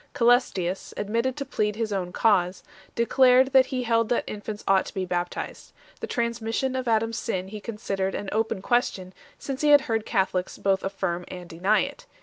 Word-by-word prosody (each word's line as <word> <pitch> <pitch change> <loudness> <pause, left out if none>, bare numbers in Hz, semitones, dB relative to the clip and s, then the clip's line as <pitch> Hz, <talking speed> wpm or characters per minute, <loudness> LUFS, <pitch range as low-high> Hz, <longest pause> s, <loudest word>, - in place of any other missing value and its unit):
Ca3les 245 +1 +4
tius, 185 0 -3
admitted 230 +6 -1
to 280 - -3
plead 210 -5 -1
his 220 -2 -2
own 180 -2 -2
cause, 185 -3 +2 0.3
declared 255 +2 +4
that 265 -1 +6
he 255 -1 -2
held 230 -1 +1
that 240 - +1
infants 210 0 -6
ought 195 -1 +4
to - - -8
be 190 -1 -1
baptized. 175 -1 -4 0.3
The - - -5
transmission 235 +2 -1
of 260 -1 -3
Adam 225 0 +2
s 230 - -4
sin 190 -3 -3
he 215 +1 -7
considered 195 -3 -3
an 205 - -4
open 220 -3 -1
question, 195 -7 0 0.2
since 270 -1 -5
he 300 - +3
had 290 -1 +8
heard 225 -4 -1
Catholics 190 -1 0
both 195 -1 +1
affirm 190 -3 -2
and 180 -1 -8
deny 190 +6 +2
it. 280 +1 -6
215 Hz, 190 wpm, -25 LUFS, 190-240 Hz, 0.3 s, had